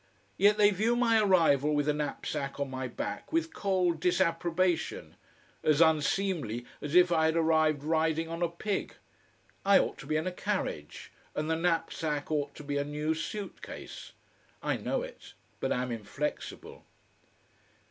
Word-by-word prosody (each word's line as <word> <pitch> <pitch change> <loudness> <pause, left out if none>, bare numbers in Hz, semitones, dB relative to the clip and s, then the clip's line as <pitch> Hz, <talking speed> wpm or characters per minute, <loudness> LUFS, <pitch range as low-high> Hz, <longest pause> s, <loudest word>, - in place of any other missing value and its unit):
Yet 205 +2 +4
they 210 -1 +6
view 220 +5 +1
my 230 -2 +4
arrival 155 -7 +4
with 145 0 +1
a 150 - +3
knapsack 145 -1 -3
on 140 -1 -2
my 130 0 -3
back 120 - -5
with 330 0 0
cold 185 - +1
disapprobation, 175 0 0 0.5
as 155 -1 +3
unseemly 160 - +2 0.2
as 150 +2 -4
if 180 0 +6
I 160 -2 +3
had 160 0 +2
arrived 155 -3 +3
riding 160 +1 +1
on 165 +1 -5
a 170 - +2
pig. 195 +4 -3 0.7
I 200 0 +6
ought - - 0
to 135 - -10
be 155 - 0
in 155 - -1
a 185 - -1
carriage, 180 - -4 0.2
and 155 +1 -1
the - - +2
knapsack 160 -3 -1
ought 145 -2 -1
to - - -9
be 145 0 -2
a 140 - +1
new 150 +2 -1
suit 195 +5 -5
case. - - -9 0.5
I - - +1
know - - -2
it, - - -11 0.2
but - - -1
am 125 0 -1
inflexible. 120 +7 -5
160 Hz, 160 wpm, -30 LUFS, 150-185 Hz, 0.7 s, they